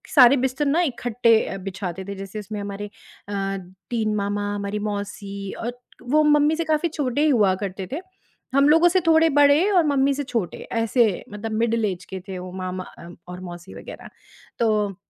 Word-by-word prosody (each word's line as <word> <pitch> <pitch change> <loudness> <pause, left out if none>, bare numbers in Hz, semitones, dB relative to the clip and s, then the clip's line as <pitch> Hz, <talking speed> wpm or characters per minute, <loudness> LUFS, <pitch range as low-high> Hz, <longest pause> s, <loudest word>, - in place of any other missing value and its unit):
सारे 265 -1 +8
बिस्तर 265 +3 0
ना 300 +5 +3
इकट्ठे 240 -5 +2
अ, - - -4
बिछाते 190 -1 -5
थे। 200 - -6
जैसे 195 +2 -7
उसमें 210 +1 -6
हमारे 200 0 -5 0.4
अ, 195 -1 -2 0.3
3 220 -3 0
मामा, 205 0 -1
हमारी 200 +1 -3
मौसी 200 -1 -5
और 245 +1 -4 0.2
वो 300 +5 +2
मम्मी 295 +1 +4
से 335 - -1
काफ़ी 315 +1 +1
छोटे 285 -3 -1
ही 310 - +4
हुआ 210 -8 +4
करते 190 -1 -6
थे। 295 - -2 0.6
हम 275 +1 +5
लोगों 325 +3 +6
से 370 +2 +3
थोड़े 325 0 +6
बड़े 290 +6 +5
और 360 -4 +5
मम्मी 275 -1 +3
से 285 +1 -3
छोटे, 230 -9 -3
ऐसे 225 -3 +1
मतलब 210 +2 -5
मिडल 230 -1 +1
ऐज 185 -3 -3
के 190 - -6
थे 190 -1 -5
वो 180 0 -7
मामा 185 0 -4 0.2
अ 170 - -10 0.2
और 180 0 -7
मौसी 175 -1 -9
वगैरह। - - -10 0.5
तो 210 -4 +1
220 Hz, 185 wpm, -23 LUFS, 195-280 Hz, 0.6 s, सारे